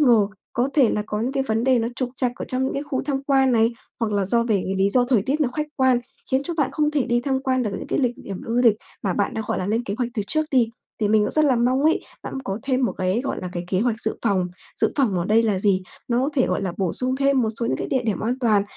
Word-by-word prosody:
ngờ, 235 -8 +5 0.3
có 245 +3 +1
thể 270 -6 +5
là 210 - 0
có 210 0 -3
những 255 +4 -1
cái 270 -1 0
vấn 225 -2 -1
đề 260 -2 +4
nó 230 - 0
trục 255 -2 -2
trặc 250 -2 0
ở - - -5
trong 255 +1 0
những 265 - -1
cái 280 - -2
khu 270 -3 -2
tham 275 -1 -2
quan 270 -2 +3
này, 230 +1 +3 0.3
hoặc 220 -2 0
là 200 -1 +1
do 235 +4 +3
về 230 -3 +1
cái 190 - -2
lý 195 +1 +2
do 250 +1 +5
thời 230 -7 +3
tiết 285 +6 -1
nó 275 - +3
khách 300 -1 -1
quan, 260 -2 +4 0.3
khiến 265 +1 +2
cho 340 +3 -4
bạn 290 -5 +1
không 300 -1 +1
thể 290 -4 0
đi 240 +1 +2
tham 265 +1 0
quan 260 -1 +1
được 210 - -1
những - - -7
cái - - -1
lịch 250 -3 +2
địa - - -13
điểm 195 -2 -6
du 235 +2 +1
lịch 225 -3 +6 0.3
mà 190 -3 0
bạn 200 - 0
đã, 220 - -2
gọi - - -1
là, 185 - -2
lên 225 +3 0
kế 200 - -3
hoạch 245 -1 -1
từ 210 - -1
trước 310 +7 +1
đi, 245 -4 +3 0.3
thì 210 - +2
mình 215 0 +4
cũng - - -2
rất 310 -1 +4
là 260 -4 +3
mong 255 +3 +2
ấy, 315 +1 +3 0.2
bạn - - -6
có 195 +2 -3
thêm 260 -2 +1
một - - 0
cái, 185 +5 0
gọi 275 - -3
là, 180 - -4
cái 175 0 -4
kế 185 - +1
hoạch 230 -1 0
dự - - +1
phòng. 195 -5 +1 0.3
Dự - - +2
phòng 255 -9 +2
ở 170 - -1
đây 220 +3 +4
là 205 -4 +1
gì? 195 -2 +2 0.3
Nó 240 0 +2
có 290 - -1
thể, 260 - +3
gọi - - -1
là, 185 -3 -2
bổ 185 -4 -1
sung 255 +1 +1
thêm 275 -2 +3
một 220 - +1
số 230 - 0
những - - 0
cái - - -4
địa 260 -2 +1
điểm 215 -3 -1
an 240 +4 -1
toàn. 215 -4 +3
240 Hz, 320 wpm, -23 LUFS, 210-265 Hz, 0.3 s, lịch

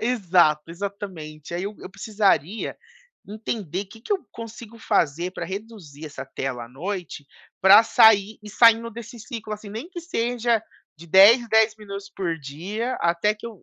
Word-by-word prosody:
Exato, 180 -10 +3
exatamente. 170 -5 -7
Aí 175 - -2
eu 205 +1 -5
eu - - -10
precisaria 200 -2 0 0.5
entender 205 -3 -4
que 220 +4 -15
que 255 - -3
eu 400 - +2
consigo 230 0 -10
fazer 175 -5 0
pra - - -5
reduzir 190 -7 -8
essa 140 -2 -8
tela 135 -2 -4
à - - -14
noite, 170 +2 -6 0.4
pra 200 +3 +8
sair 220 -2 +5
e 210 - -10
saindo 230 +2 +5
desse 235 +1 -10
ciclo 225 -3 -7
assim, 210 0 -7
nem 230 - -7
que 355 -2 -7
seja 240 -7 0 0.4
de 170 +2 -13
10 200 +8 +8
em - - -9
10 220 0 +4
minutos 200 -1 -8
por 170 -4 -2
dia 190 - -4
até 170 +5 +2
que 215 - -10
eu, 220 -6 -10
205 Hz, 165 wpm, -24 LUFS, 170-225 Hz, 0.5 s, pra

